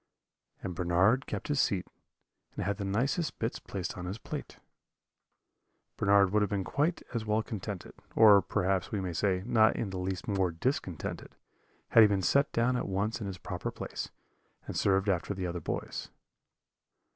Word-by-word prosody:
"And 90 - -3
Bernard 90 +9 +2
kept - - -4
his 145 -2 0
seat, 95 -7 +1 0.7
and - - -3
had 100 +1 -1
the 100 - -4
nicest 130 - 0
bits 115 +1 -2
placed 95 -3 -5
on 90 - -6
his 95 +4 -4
plate. - - -7 1.4
"Bernard 100 -1 +4
would 105 +1 +3
have 105 - +1
been 100 -2 -1
quite 150 - 0
as 115 -2 -1
well 110 +1 +1
contented, 100 -3 -6 0.2
or, 105 -3 +8
perhaps 95 0 0
we 105 - -1
may 90 -2 -3
say, 95 +1 +1
not 115 -2 +4
in 100 - -2
the 95 - -4
least 95 +5 -3
more 95 -3 +1
discontented, 90 - -3 0.5
had 115 - +7
he 110 - +9
been 100 -2 0
set 140 - +3
down 120 +2 +2
at - - -3
once 105 +5 -1
in 100 - -3
his 95 -1 -5
proper - - -4
place, - - -5 0.6
and - - -6
served 95 0 +2
after 95 +1 0
the 95 -1 -3
other 85 -1 -3
boys. - - -4
100 Hz, 175 wpm, -30 LUFS, 95-110 Hz, 1.4 s, he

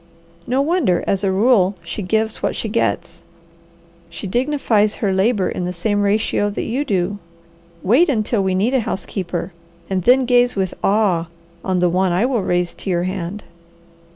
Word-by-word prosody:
No 260 +3 +1
wonder, 290 - +1
as 195 0 0
a 195 - +2
rule, 200 -1 +3
she 170 +5 -5
gives 220 +3 -1
what - - -1
she - - -3
gets. 210 -5 -2 0.9
She 170 - -8
dignifies 230 -2 +1
her 200 -4 -1
labour 195 +1 +2
in 180 - -3
the 180 - -3
same 205 +4 0
ratio 205 0 +1
that 205 - -4
you 255 +5 -1
do. 200 -4 -1 0.6
Wait 260 - +4
until 220 -4 +1
we 190 -1 0
need 215 +7 +1
a 265 - +3
housekeeper, 190 -5 -4 0.4
and 190 -1 +1
then 255 +7 +4
gaze 245 0 +3
with 190 -2 -1
awe 195 -5 +2 0.4
on 185 -1 0
the 180 0 +3
one 185 +1 +1
I 180 +7 +2
will 250 -4 0
raise 180 -1 0
to - - -7
your 175 -1 +1
hand." 185 +2 -4
205 Hz, 175 wpm, -19 LUFS, 185-230 Hz, 0.9 s, Wait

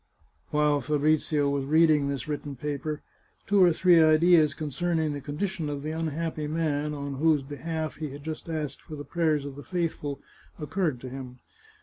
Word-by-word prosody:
While 150 -1 +2
Fabrizio 150 +1 +1
was 140 -1 0
reading 155 -1 +4
this 140 0 -3
written 145 -1 -4
paper, 150 +2 -4 0.4
two 200 -1 +3
or 175 - +6
three 175 +1 +5
ideas 155 -1 +5
concerning 155 +1 -1
the 145 - -5
condition 160 +3 -3
of 145 -1 -4
the 155 - -3
unhappy 160 -1 -2
man 150 -1 -1
on 140 -1 -5
whose 155 -1 +3
behalf 155 +3 -4
he 155 -1 -4
had 140 +1 -9
just 160 +1 -6
asked 150 -4 -3
for 155 - -9
the 145 0 -7
prayers 155 -4 +1
of 140 -1 -6
the 145 - -9
faith 175 -3 -1
ful, 145 -2 -5 0.4
occurred 155 -4 -1
to 130 - -6
him. 125 -1 -8
150 Hz, 180 wpm, -27 LUFS, 145-160 Hz, 0.4 s, or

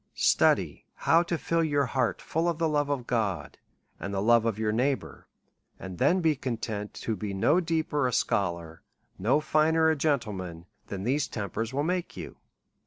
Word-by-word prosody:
Study - - +2
how 165 +1 +4
to 170 -1 -2
fill 165 +1 0
your 145 -3 +1
heart 125 -1 -1
full 165 +2 0
of 170 - -2
the 165 -1 +1
love 145 -2 0
of 135 -4 -2
God, 100 -11 -2 0.4
and 100 - -5
the 100 - -1
love 115 +2 +4
of 115 -3 0
your 110 -1 0
neighbour, 130 +5 -2 0.5
and 95 -2 -8
then 185 +2 +3
be 160 -2 +3
content 115 -5 -4
to 110 - -3
be 100 0 -4
no 145 - +3
deeper 160 -5 0
a - - -1
scholar, 85 -7 -1 0.4
no 120 +10 +3
finer 160 +1 +3
a - - +1
gentleman, 105 - -2 0.2
than 95 -1 -5
these 135 +5 +1
tempers 110 +2 -4
will 140 +2 -1
make 180 +2 -2
you. - - -8
125 Hz, 175 wpm, -28 LUFS, 105-155 Hz, 0.5 s, how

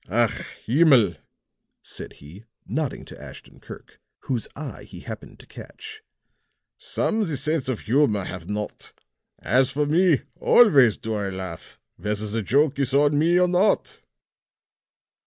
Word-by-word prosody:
"Ach, 115 +2 +2 0.3
himmel!" 135 -3 +4 0.7
said - - -8
he, 85 +10 -14 0.2
nodding 140 +7 -3
to - - -12
Ashton - - -13
Kirk, - - -13 0.2
whose 125 -4 -3
eye 145 -2 -7
he - - -12
happened - - -9
to - - -16
catch, 435 0 -11 0.8
"some 225 0 -1
the 160 -9 -1
sense 150 0 -1
of 125 - -2
humor 115 -5 +2
have 90 -2 -8
not. 105 0 -5 0.5
As 130 +3 +3
for 145 +3 -1
me, 160 -1 +3 0.2
always 140 - +5
do 110 - -4
I 100 -2 -2
laugh, 95 -3 -8 0.2
whether 105 0 -3
the 110 +2 -2
joke 140 +6 +1
is 135 -1 0
on 145 +1 +3
me 170 +3 +3
or 180 - +4
not." 180 +4 +1
135 Hz, 140 wpm, -24 LUFS, 105-155 Hz, 0.8 s, always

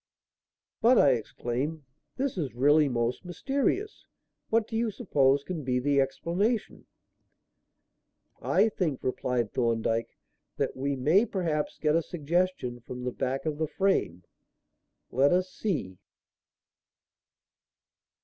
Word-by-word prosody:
"But," 245 +2 +6
I 140 - +6
exclaimed, 130 +6 -3 0.3
"this 270 0 -1
is 145 -10 -3
really 145 +3 +4
most 120 0 -1
mysterious. 275 - -2 0.4
What 225 0 +2
do 225 - -6
you 230 0 +1
suppose 140 - +2
can 165 -2 -5
be 125 -1 0
the 140 +2 +2
explanation?" 180 - -1 1.5
"I 205 +4 +3
think," 170 -9 -2
replied 125 -3 -1
Thorndyke, 115 -1 0 0.4
"that - - -1
we 140 +1 -1
may 160 - +3
perhaps 160 -6 -2
get 150 0 +1
a 165 - +3
suggestion 170 -6 -1
from 125 +1 -8
the 125 - -2
back 130 +3 -2
of 155 -1 -2
the 160 - 0
frame. 150 - 0 0.9
Let 135 +3 +3
us 185 +1 +1
see." 120 - -3
150 Hz, 120 wpm, -28 LUFS, 125-185 Hz, 1.5 s, But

